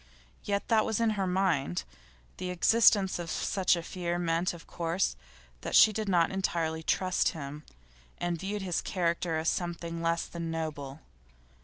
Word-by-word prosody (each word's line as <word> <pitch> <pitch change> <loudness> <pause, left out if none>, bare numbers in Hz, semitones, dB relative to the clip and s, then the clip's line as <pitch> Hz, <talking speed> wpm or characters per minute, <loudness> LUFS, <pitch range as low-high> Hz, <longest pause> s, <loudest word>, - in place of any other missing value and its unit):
Yet 200 -1 -1
that 220 -2 +4
was 220 -1 -1
in 230 -1 +3
her 195 -3 -1
mind. 180 - 0 0.5
The 185 - -4
existence 195 +1 +4
of 170 -1 -5
such 185 +1 +1
a 170 - -4
fear 175 0 -3
meant, 170 +1 0
of 170 -1 -11
course, 170 - -1 0.5
that - - -2
she 215 - +8
did 215 -1 -2
not 170 -3 +3
entirely 165 -4 -1
trust 185 +3 +1
him, 145 +1 -7 0.5
and 175 -1 -2
viewed 200 +2 -3
his 180 -3 -1
character 170 -2 -1
as 160 +1 -2
something 170 -2 -2
less 165 0 0
than 170 -1 -5
noble. 155 -3 -4
175 Hz, 160 wpm, -30 LUFS, 165-190 Hz, 0.5 s, she